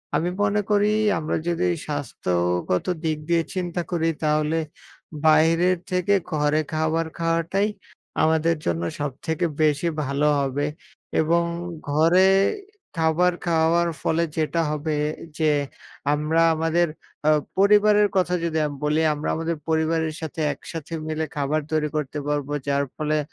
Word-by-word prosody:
আমি 175 Hz, -, +1 dB
মনে 205 Hz, +1 st, +2 dB
করি 205 Hz, 0 st, +4 dB, 0.3 s
আমরা 160 Hz, -1 st, -2 dB
যদি 175 Hz, +1 st, +1 dB, 0.2 s
স্বাস্থ্যগত 90 Hz, -11 st, -1 dB, 0.2 s
দিক 160 Hz, -1 st, 0 dB
দিয়ে 170 Hz, -1 st, +3 dB
চিন্তা 175 Hz, -1 st, -2 dB
করি 165 Hz, -2 st, +1 dB
তাহলে 155 Hz, +1 st, +1 dB, 0.7 s
বাইরের 165 Hz, +4 st, +4 dB
থেকে 180 Hz, +2 st, +2 dB, 0.2 s
ঘরে 150 Hz, 0 st, +2 dB
খাবার 160 Hz, +1 st, 0 dB
খাওয়াটাই 165 Hz, +4 st, +1 dB, 0.6 s
আমাদের 160 Hz, +1 st, +3 dB
জন্য 85 Hz, 0 st, 0 dB, 0.2 s
সবথেকে 150 Hz, +5 st, -2 dB, 0.2 s
বেশি 150 Hz, +2 st, +2 dB, 0.2 s
ভালো 140 Hz, +2 st, 0 dB
হবে। 140 Hz, +1 st, -1 dB, 0.6 s
এবং 170 Hz, +2 st, +2 dB, 0.5 s
ঘরে 165 Hz, +6 st, +4 dB, 0.7 s
খাবার 165 Hz, +3 st, +3 dB
খাওয়ার 170 Hz, 0 st, +3 dB
ফলে 165 Hz, +1 st, +1 dB
যেটা 160 Hz, +2 st, +1 dB
হবে। 150 Hz, +1 st, -2 dB, 0.4 s
যে 155 Hz, -2 st, +3 dB, 0.6 s
আমরা 155 Hz, +2 st, +1 dB
আমাদের 165 Hz, +2 st, +1 dB, 0.4 s
আ -, -, +6 dB, 0.3 s
পরিবারের 210 Hz, +1 st, +5 dB
কথা 180 Hz, -1 st, +2 dB
যদি 165 Hz, -1 st, -1 dB
আম 145 Hz, -, -6 dB
বলি 150 Hz, +2 st, +2 dB
আমরা 150 Hz, 0 st, -3 dB
আমাদের 165 Hz, 0 st, -2 dB
পরিবারের 160 Hz, 0 st, +1 dB
সাথে 160 Hz, 0 st, -5 dB
একসাথে 165 Hz, +3 st, -8 dB
মিলে 155 Hz, 0 st, -1 dB
খাবার 145 Hz, +2 st, 0 dB
তৈরি 155 Hz, -1 st, +1 dB
করতে 150 Hz, -1 st, -2 dB
পারবো 145 Hz, -1 st, -1 dB
যার 140 Hz, 0 st, +2 dB
ফলে 155 Hz, 0 st, 0 dB
160 Hz, 130 wpm, -23 LUFS, 150-170 Hz, 0.7 s, আ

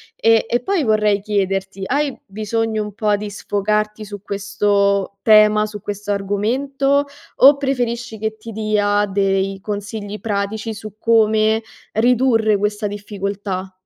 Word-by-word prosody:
e 225 Hz, 0 st, +3 dB
e 240 Hz, -, +1 dB
poi 380 Hz, -6 st, 0 dB
vorrei 210 Hz, -2 st, +2 dB
chiederti: 195 Hz, -1 st, -2 dB
hai 285 Hz, +3 st, -1 dB
bisogno 220 Hz, +2 st, -2 dB
un 210 Hz, -1 st, -5 dB
po' 210 Hz, -1 st, 0 dB
di 210 Hz, 0 st, -5 dB
sfogarti 210 Hz, +1 st, -2 dB
su 205 Hz, -1 st, -8 dB
questo 200 Hz, -1 st, 0 dB
tema, 215 Hz, -1 st, +5 dB
su 210 Hz, -2 st, -8 dB
questo 205 Hz, 0 st, -4 dB
argomento, 270 Hz, +8 st, 0 dB, 0.3 s
o 280 Hz, +2 st, +7 dB
preferisci 245 Hz, -4 st, -2 dB
che 220 Hz, 0 st, -3 dB
ti 225 Hz, +1 st, -9 dB
dia 205 Hz, -1 st, +1 dB
dei 195 Hz, -1 st, 0 dB
consigli 205 Hz, 0 st, -5 dB
pratici 215 Hz, +1 st, -2 dB
su 215 Hz, -1 st, -9 dB
come 220 Hz, -1 st, +3 dB, 0.3 s
ridurre 230 Hz, -2 st, +3 dB
questa 210 Hz, +1 st, -1 dB
difficoltà? 200 Hz, -2 st, -5 dB
210 Hz, 130 wpm, -19 LUFS, 200-225 Hz, 0.3 s, o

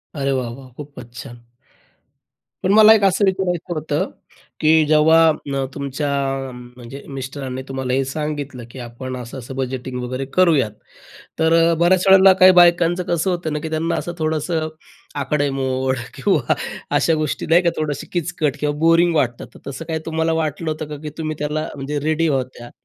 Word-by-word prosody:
अरे 140 Hz, -1 st, -1 dB
वाह, 130 Hz, -2 st, -1 dB
वाह, 130 Hz, +2 st, -11 dB
खूपच 130 Hz, -5 st, -11 dB
छान! 120 Hz, -, -9 dB, 1.3 s
पण 190 Hz, -, +2 dB
मला 220 Hz, 0 st, +8 dB
एक 215 Hz, -, +1 dB
असं 195 Hz, +1 st, +3 dB
विचारायचं 180 Hz, -3 st, -1 dB
होतं, 150 Hz, -1 st, -2 dB, 0.5 s
की 155 Hz, 0 st, +4 dB
जेव्हा 155 Hz, -2 st, +3 dB
तुमच्या 140 Hz, +1 st, -3 dB, 0.5 s
म्हणजे 125 Hz, +2 st, -11 dB
मिस्टरांनी 130 Hz, -1 st, -6 dB
तुम्हाला 130 Hz, -1 st, -3 dB
हे 135 Hz, +1 st, +1 dB
सांगितलं, 145 Hz, -2 st, -5 dB
की 130 Hz, -, -11 dB
आपण 125 Hz, +2 st, -7 dB
असं-असं 125 Hz, +1 st, -8 dB
बजेटिंग 130 Hz, -1 st, -4 dB
वगैरे 130 Hz, +2 st, -4 dB
करूयात, 160 Hz, -11 st, +3 dB, 0.7 s
तर 160 Hz, 0 st, +2 dB, 0.2 s
अ, 170 Hz, -, +2 dB
बऱ्याच 180 Hz, +1 st, +3 dB
वेळेला 190 Hz, 0 st, +8 dB
काही 185 Hz, 0 st, +9 dB
बायकांचं 175 Hz, 0 st, +4 dB
कसं 170 Hz, +2 st, 0 dB
होतं 175 Hz, -3 st, -2 dB
ना, 150 Hz, -, -1 dB
की 160 Hz, +1 st, -6 dB
त्यांना 160 Hz, +1 st, -1 dB
असं 175 Hz, -, -3 dB
थोडंसं 155 Hz, +1 st, -1 dB, 0.6 s
आकडेमोड 130 Hz, -2 st, -1 dB, 0.2 s
किंवा -, -, +1 dB, 0.4 s
अशा 165 Hz, -, +3 dB
गोष्टी, 155 Hz, -2 st, -2 dB
नाही 170 Hz, +2 st, +4 dB
का, 170 Hz, -, +2 dB
थोडीशी 150 Hz, -2 st, -3 dB
किचकट 170 Hz, -4 st, -1 dB
किंवा 145 Hz, 0 st, 0 dB
बोरिंग 165 Hz, +2 st, +4 dB
वाटतात. 120 Hz, -5 st, 0 dB
तर -, -, -12 dB
तसं 140 Hz, +4 st, -7 dB
काही 160 Hz, -1 st, -3 dB
तुम्हाला 160 Hz, 0 st, 0 dB
वाटलं 155 Hz, +1 st, -2 dB
होतं 155 Hz, -1 st, -5 dB
का? 150 Hz, -, -6 dB
की 155 Hz, -, -5 dB
तुम्ही 155 Hz, -1 st, -3 dB
त्याला 150 Hz, +1 st, -2 dB
म्हणजे 145 Hz, +1 st, -4 dB
रेडी 160 Hz, +1 st, +1 dB
होत्या? 130 Hz, -4 st, -3 dB
150 Hz, 165 wpm, -20 LUFS, 135-165 Hz, 1.3 s, काही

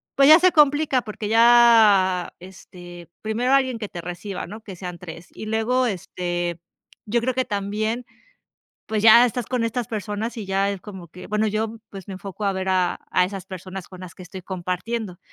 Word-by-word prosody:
pues 275 Hz, 0 st, +5 dB
ya 310 Hz, +2 st, +10 dB
se 365 Hz, +1 st, +4 dB
complica 290 Hz, -3 st, +3 dB
porque 210 Hz, -2 st, -6 dB
ya, 225 Hz, -6 st, +5 dB
este, 175 Hz, -2 st, -13 dB
primero 235 Hz, +4 st, 0 dB
alguien 260 Hz, -3 st, +2 dB
que 210 Hz, -, -4 dB
te 175 Hz, -, -8 dB
reciba, 180 Hz, +3 st, -6 dB
¿no? 215 Hz, +2 st, -9 dB
Que 195 Hz, -3 st, -10 dB
sean 180 Hz, -1 st, -7 dB
3. 165 Hz, 0 st, -10 dB
Y -, -, -9 dB
luego, 225 Hz, +4 st, +1 dB
este, 175 Hz, -3 st, -3 dB, 0.5 s
yo 235 Hz, +3 st, 0 dB
creo 255 Hz, +2 st, -1 dB
que 260 Hz, 0 st, -1 dB
también, 215 Hz, +4 st, -3 dB, 0.8 s
pues 215 Hz, -1 st, -2 dB
ya 225 Hz, +2 st, +8 dB
estás 245 Hz, 0 st, -3 dB
con 250 Hz, -2 st, -2 dB
estas 230 Hz, +1 st, -2 dB
personas 215 Hz, +1 st, -4 dB
y 215 Hz, -, -5 dB
ya 195 Hz, +1 st, 0 dB
es 200 Hz, -2 st, -5 dB
como 190 Hz, -4 st, -10 dB
que, 180 Hz, +3 st, -12 dB
bueno, 215 Hz, +1 st, 0 dB
yo, 220 Hz, +2 st, -2 dB
pues, 195 Hz, -2 st, -10 dB
me 195 Hz, -, -6 dB
enfoco 195 Hz, +2 st, -8 dB
a 200 Hz, -, +2 dB
ver 190 Hz, 0 st, -4 dB
a, 185 Hz, -1 st, +1 dB
a 180 Hz, -, +3 dB
esas 195 Hz, 0 st, -7 dB
personas 185 Hz, 0 st, -8 dB
con 185 Hz, -1 st, -12 dB
las 180 Hz, -2 st, -9 dB
que 185 Hz, -, -12 dB
estoy 185 Hz, +2 st, -9 dB
compartiendo, 185 Hz, +2 st, -4 dB
205 Hz, 195 wpm, -23 LUFS, 185-230 Hz, 0.8 s, ya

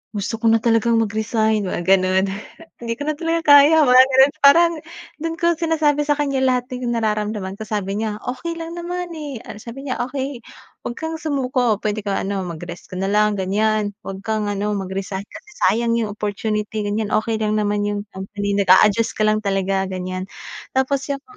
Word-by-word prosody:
"Gusto 205 Hz, +2 st, -2 dB
ko 230 Hz, -, -3 dB
na 225 Hz, -, +4 dB
talagang 230 Hz, 0 st, +3 dB
mag-resign," 220 Hz, 0 st, 0 dB
Mga 180 Hz, -, -3 dB
ganun. 190 Hz, 0 st, +4 dB, 0.5 s
"Hindi 230 Hz, -1 st, -3 dB
ko -, -, -3 dB
na 305 Hz, -, -1 dB
talaga 330 Hz, +1 st, -1 dB
kaya," 305 Hz, +3 st, +7 dB
Mga 255 Hz, +1 st, +8 dB
ganun. 265 Hz, +2 st, +5 dB
Parang 335 Hz, +5 st, +7 dB, 0.5 s
doon 330 Hz, 0 st, -2 dB
ko 340 Hz, 0 st, +2 dB
sinasabi 315 Hz, -3 st, +1 dB
sa 295 Hz, -, +4 dB
kanya 280 Hz, -2 st, 0 dB
lahat 250 Hz, -1 st, +1 dB
ng 250 Hz, -1 st, -3 dB
nararamdaman 210 Hz, -3 st, -2 dB
ko. -, -, -4 dB
Sabi 205 Hz, -1 st, -2 dB
niya, 215 Hz, -1 st, -3 dB
"Okey 295 Hz, +7 st, -4 dB
lang 330 Hz, +1 st, -6 dB
naman, 355 Hz, +1 st, -4 dB
eh." 290 Hz, -6 st, -6 dB
Ano, 210 Hz, -, -8 dB
sabi 270 Hz, +4 st, -8 dB
niya, 255 Hz, -, -3 dB
okey 265 Hz, -1 st, -5 dB, 0.4 s
wag 240 Hz, -, -4 dB
kang 320 Hz, 0 st, -3 dB
sumuko, 255 Hz, -7 st, 0 dB
pwede 215 Hz, 0 st, -1 dB
ka 200 Hz, -, -1 dB
ano, 195 Hz, -1 st, -2 dB
mag-rest 170 Hz, +1 st, -8 dB
ka 185 Hz, -, -6 dB
na 195 Hz, -, -1 dB
lang, 210 Hz, 0 st, +3 dB
ganyan. 210 Hz, +2 st, 0 dB
Wag 195 Hz, 0 st, -6 dB
kang 215 Hz, -2 st, -1 dB
ano, 205 Hz, +1 st, -2 dB
mag-resign 190 Hz, 0 st, -4 dB
kasi 425 Hz, -, -13 dB, 0.2 s
sayang 230 Hz, +1 st, +1 dB
iyong 215 Hz, -3 st, -1 dB
opportunity, 210 Hz, 0 st, -2 dB
ganyan. 210 Hz, +1 st, -1 dB
Okey 220 Hz, +1 st, +1 dB
lang 215 Hz, 0 st, +1 dB
naman 205 Hz, 0 st, 0 dB
iyong 205 Hz, 0 st, -2 dB
company, 200 Hz, +1 st, -4 dB
nag-a-adjust 205 Hz, +4 st, +4 dB
ka 215 Hz, -, +1 dB
lang 215 Hz, 0 st, +2 dB
talaga, 195 Hz, -1 st, 0 dB
ganyan. 185 Hz, 0 st, -4 dB, 0.5 s
Tapos 265 Hz, +1 st, 0 dB
iyong 280 Hz, 0 st, -3 dB
220 Hz, 185 wpm, -20 LUFS, 205-265 Hz, 0.5 s, Mga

